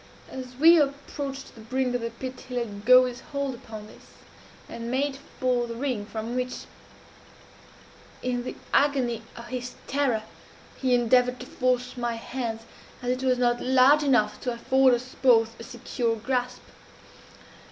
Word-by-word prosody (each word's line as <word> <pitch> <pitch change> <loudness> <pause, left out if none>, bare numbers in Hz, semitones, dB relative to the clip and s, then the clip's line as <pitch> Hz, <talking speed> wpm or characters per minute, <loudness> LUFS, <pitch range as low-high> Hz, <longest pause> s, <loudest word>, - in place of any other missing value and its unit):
As 255 -1 -7
we 330 +5 +7
approached 280 -1 -3
the 225 - -13
brink 255 +3 -1
of 245 - -1
the 230 - -2
pit 255 +3 -8
he 250 - -5
let 210 -4 -4
go 255 +1 +8
his 245 0 -5
hold 280 -1 -3
upon 220 -3 -9
this, 215 - -16 0.6
and 230 0 -6
made 270 +2 -1 0.2
for 250 -2 +1
the 230 - -6
ring, 240 -5 -2
from 225 +2 -5
which, 250 0 -2 1.6
in 245 -1 -1
the - - -5 0.2
agony 260 -5 +2
of 235 0 -10
his 250 0 -5
terror, 265 -6 0 0.5
he 255 -2 +2
endeavored 250 +1 +3
to - - -7
force 250 0 -1
my 240 -1 -1
hands, 230 -1 -4 0.4
as 245 - 0
it 255 +1 -2
was 255 -1 +3
not 240 -1 +2
large 265 +3 +5
enough 245 -7 +2
to 250 - -1
afford 260 +2 +4
us 250 +2 -7
both 230 -3 +4
a - - -7
secure 240 -1 -2
grasp. 250 +2 -2
250 Hz, 160 wpm, -26 LUFS, 235-260 Hz, 1.6 s, go